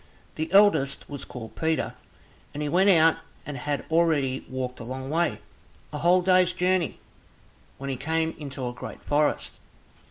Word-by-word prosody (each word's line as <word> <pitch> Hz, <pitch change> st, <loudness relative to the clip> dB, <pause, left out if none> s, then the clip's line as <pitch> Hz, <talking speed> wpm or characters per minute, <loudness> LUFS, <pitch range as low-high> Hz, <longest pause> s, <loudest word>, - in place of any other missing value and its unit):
The 160 Hz, +2 st, -4 dB
eldest 195 Hz, -9 st, +4 dB
was 140 Hz, -2 st, -7 dB
called 115 Hz, -3 st, -9 dB
Peter, 160 Hz, 0 st, -1 dB, 0.6 s
and 150 Hz, -, -3 dB
he 150 Hz, -, -1 dB
went 185 Hz, +6 st, +4 dB
out 165 Hz, -3 st, +5 dB, 0.3 s
and 145 Hz, -, -5 dB
had 145 Hz, +2 st, -3 dB
already 155 Hz, -6 st, +2 dB
walked 130 Hz, -1 st, -4 dB
a -, -, -6 dB
long 130 Hz, +3 st, -6 dB
way, 170 Hz, +2 st, +1 dB, 0.6 s
a 150 Hz, -, -3 dB
whole 180 Hz, +2 st, +4 dB
day's 185 Hz, -1 st, +4 dB
journey, 180 Hz, -4 st, 0 dB, 0.8 s
when 140 Hz, 0 st, -4 dB
he 130 Hz, -, -3 dB
came 160 Hz, +3 st, -1 dB
into 135 Hz, -3 st, -5 dB
a 120 Hz, -, -4 dB
great 125 Hz, -, -9 dB
forest. 150 Hz, 0 st, 0 dB
150 Hz, 160 wpm, -26 LUFS, 135-170 Hz, 0.8 s, out